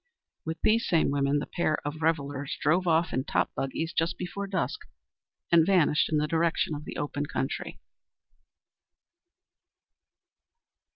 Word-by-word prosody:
With 160 0 -4
these 230 +2 +3
same 165 -4 +2
women 140 0 +1
the 145 - -2
pair 155 -3 0
of 150 +2 -4
revellers 145 -3 -1
drove 175 +5 +2
off 165 0 +2
in 130 +2 0
top - - 0
buggies 160 +5 -3
just 165 +1 0
before 200 +3 -4
dusk, 190 -3 -2 0.7
and 170 -1 +7
vanished 165 -5 +3
in 155 - +3
the 150 - +2
direction 165 0 +1
of 150 +1 -6
the - - -7
open 145 0 -3
country. - - -3
160 Hz, 135 wpm, -28 LUFS, 145-170 Hz, 0.7 s, and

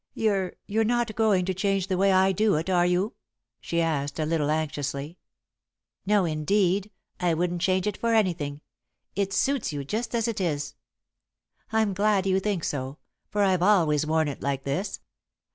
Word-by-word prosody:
"You're 195 -4 0
you're 220 +2 +1
not 240 -1 0
going 210 -5 +2
to 190 - -1
change 195 0 0
the 190 -1 -1
way 195 +2 +3
I 190 0 +4
do 210 +2 +2
it, 165 +5 -1
are 175 -1 +3
you?" 180 +5 0 0.5
she 170 - -2
asked, 145 -3 -1
a 155 - 0
little 155 -2 0
anxiously. 150 0 -3 0.9
"No, 205 -2 +3
indeed! 185 +5 +1 0.3
I 175 -3 +1
wouldn't 175 +1 -1
change 185 0 +1
it 210 -2 -2
for 230 - 0
anything. 165 -9 0 0.5
It 195 0 0
suits 265 +4 0
you 145 -2 -4
just 225 - -3
as 230 -1 +1
it 225 -4 -2
is." 145 -5 -2 1.0
"I'm 220 -2 +2
glad 200 0 +2
you 190 0 +2
think 195 -4 -2
so, 135 0 -3 0.3
for 205 0 +1
I've 185 -3 +2
always 170 -7 +3
worn 160 0 +2
it 140 - -5
like 135 -1 -2
this. 180 +9 -3
185 Hz, 175 wpm, -26 LUFS, 155-205 Hz, 1.0 s, I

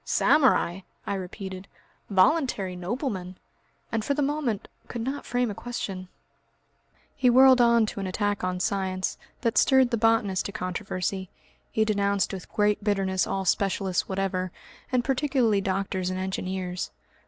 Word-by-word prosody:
"Samurai!" 255 - +3 0.3
I - - -2
repeated, 190 0 -6 0.4
"voluntary 195 - +2
noblemen!" 185 - -4 0.5
and 225 -2 -1
for 280 - 0
the 290 - +1
moment 275 -7 -1 0.2
could 235 -2 -4
not 270 +3 -4
frame 245 -2 0
a - - -4
question. 195 -5 -5 1.1
He 255 - +3
whirled 260 +1 +7
on 235 -1 +5
to 210 - -5
an 195 - -3
attack 205 +1 -1
on 180 0 -1
science, 185 -1 -1 0.2
that 230 -2 +2
stirred 265 -2 +4
the 235 - +1
botanist 215 -4 +2
to - - -6
controversy. 185 0 -3 0.4
He 220 - +2
denounced 200 -2 +1
with 190 - -8
great 210 0 +1
bitterness 195 -3 +1
all 195 0 -2
specialists 190 0 0
whatever, 190 -1 -1 0.4
and 250 -1 +2
particularly 260 -6 +2
doctors 190 -1 -1
and 185 - -3
engineers. 185 -1 -3
200 Hz, 140 wpm, -26 LUFS, 185-235 Hz, 1.1 s, whirled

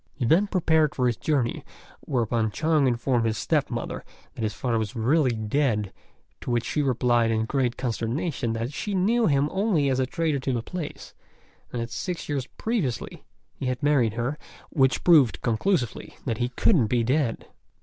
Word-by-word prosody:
He 130 - -2
then 175 - +4
prepared 160 -6 +2
for 125 - +1
his 120 -2 +2
journey, 120 +4 -1 0.4
whereupon 115 -3 0
Chung 155 +4 +2
informed 120 0 +1
his 110 -1 -1
step - - 0
mother - - -4 0.3
that - - -8
his 110 -1 -1
father 120 -3 0
was 110 +3 -4
really 130 +5 +2
dead, 110 -2 0 0.5
to - - -7
which 120 -1 0
she 150 - 0
replied 120 -3 +2
in 110 0 +1
great 125 -1 0
consternation 120 +1 -2
that 115 +4 -3
she 205 +6 -3
knew 220 +5 +2
him 140 -2 +2
only 190 -8 +1
as 130 - 0
a 130 - +1
trader 155 0 -1
to 130 0 -2
the 115 -2 -2
place, 175 0 -7 0.6
and 120 - -3
that 115 - -8
six 180 +7 -4
years 140 -3 -2
previously 195 - -2 0.3
he 135 - -5
had 125 0 -2
married 135 -7 +3
her, 120 +6 -2 0.3
which 135 -4 +2
proved 135 - +5
conclusively 120 - -1
that 115 - -2
he 120 0 0
couldn't 125 - +3
be 120 +1 +1
dead. 125 -1 0
130 Hz, 180 wpm, -25 LUFS, 115-150 Hz, 0.6 s, proved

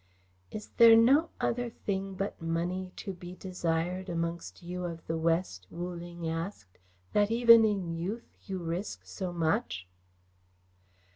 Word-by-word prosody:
"Is 210 -1 -7
there 230 -1 +9
no 270 +8 +5
other 245 0 0
thing 195 -3 -3
but 195 -1 -3
money 175 +3 -2
to 195 - -5
be 180 0 -9
desired 180 0 -2
amongst 170 0 -3
you 180 +1 -4
of 170 -2 -5
the 165 - -2
West," 165 - 0
Wu 175 +1 -5
Ling 170 -1 -6
asked, 165 - -5 0.3
"that 205 0 +4
even 230 0 +8
in 195 -6 0
youth 195 +8 -5
you 190 -1 -3
risk 175 +3 -4
so 185 -3 -4
much?" 160 - -1
180 Hz, 140 wpm, -30 LUFS, 165-200 Hz, 0.3 s, there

